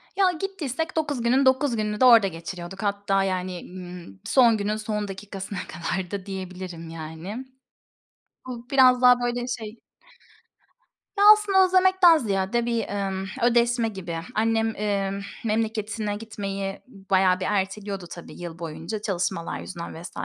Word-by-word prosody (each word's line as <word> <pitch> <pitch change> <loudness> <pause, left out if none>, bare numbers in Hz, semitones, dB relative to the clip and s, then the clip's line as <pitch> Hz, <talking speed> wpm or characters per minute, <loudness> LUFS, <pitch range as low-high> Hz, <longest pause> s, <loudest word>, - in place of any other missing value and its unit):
Ya 385 -2 +4
gittiysek 325 -5 -4
9 290 -5 -1
günün 255 +4 +3
9 260 0 +3
gününü 210 -1 -2
de - - +7
orada 230 -5 +8
geçiriyorduk. 175 +2 -7
Hatta, 200 -1 +1
yani, 185 -1 -2
ımm, 175 - -9
son 235 -4 +5
günün 210 +1 -1
son 210 -1 -3
dakikasına 195 0 -6
kadar 180 +1 -4
da 200 -2 -4
diyebilirim 185 -3 -7
yani. 165 +9 -7 1.0
Bu 245 -1 -8
biraz 255 -2 +5
daha, 250 0 +7
böyle, 245 0 -1
şey 225 -2 -5 1.4
Ya, 400 - +3
aslında 400 -3 +3
özlemekten 370 -2 +5
ziyade 215 -1 0
bir, 235 -1 0
emm, 195 -1 -2 0.2
ödeşme 240 -1 +3
gibi. 180 -5 -6 0.2
Annem, 225 0 +1
emm, 200 -1 -1 0.2
memleketine 215 -1 -1
gitmeyi 200 -2 -5
bayağı 190 -4 +1
bir 185 - -2
erteliyordu 195 -1 -2
tabii 170 0 -10
yıl 170 -1 -7
boyunca, 170 +6 -5
çalışmalar 180 -4 -2
yüzünden 170 -3 -7
vs. 175 - -8
210 Hz, 135 wpm, -25 LUFS, 190-240 Hz, 1.4 s, orada